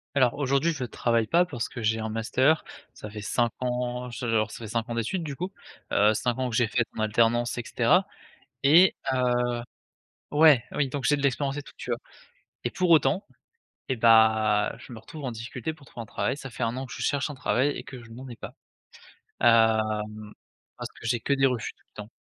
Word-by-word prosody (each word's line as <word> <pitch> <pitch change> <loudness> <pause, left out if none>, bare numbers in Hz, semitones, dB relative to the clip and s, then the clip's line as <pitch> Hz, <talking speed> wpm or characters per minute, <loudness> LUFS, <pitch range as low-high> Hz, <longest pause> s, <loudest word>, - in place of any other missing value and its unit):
Alors 125 -4 +4
aujourd'hui 140 +4 +2
je 130 -4 -5
travaille 115 -1 0
pas 175 +2 +4
parce 130 -8 -4
que 120 -3 -7
j'ai 110 +1 +1
un 110 0 -3
master, 125 +8 +2 0.3
ça 105 - -9
fait 105 -1 -7
5 120 +2 0
ans, 125 0 -2
j 120 +2 -7
alors 110 -2 +1
ça - - -8
fait 115 -2 -8
5 115 +2 -2
ans 120 - -3
d'études 115 - -2
du 145 -3 -5
coup, 180 +5 -4 0.4
heu, 105 +1 +4
5 120 +3 -1
ans 130 -1 0
que 115 - -4
j'ai 120 -2 +3
fait 120 +2 +1
en - - -4
alternance 115 +2 +2
et - - -1
cetera - - +2 0.6
et 165 +6 +6 0.2
heu 130 - 0 1.1
ouais, 150 -5 +6
oui 140 -3 0
donc 135 -2 -4
j'ai 145 +1 +3
de 140 - -5
l'expérience 140 +1 0
et 145 - -5
tout - - -15
tu - - -9
vois? - - 0 0.7
Et - - 0
pour 180 -2 0
autant, 155 +4 +3 0.6
eh 130 - 0
bah, 110 -2 +4
je 120 - -12
me 110 - -9
retrouve 150 +5 -10
en 125 - -2
difficulté 120 +6 -5
pour 140 -4 -19
trouver 115 - -8
un - - -10
travail, 130 +6 -2
ça 135 -3 -8
fait 120 - -7
1 115 +2 0
an 130 0 -4
que - - -11
je - - -6
cherche 145 +1 0
un - - -6
travail 130 +3 +1
et - - -5
que 130 -2 -10
je 115 -1 -14
n'en 130 +3 -9
ai 120 - -9
pas, - - -9 0.9
hem, 110 -2 +2 0.5
parce - - -6
que - - -16
j'ai 120 +1 +1
que 140 - -2
des 135 -1 +4
refus 125 -4 -1
tout - - -33
le - - -4
temps! 110 - -19
120 Hz, 225 wpm, -26 LUFS, 110-135 Hz, 1.1 s, et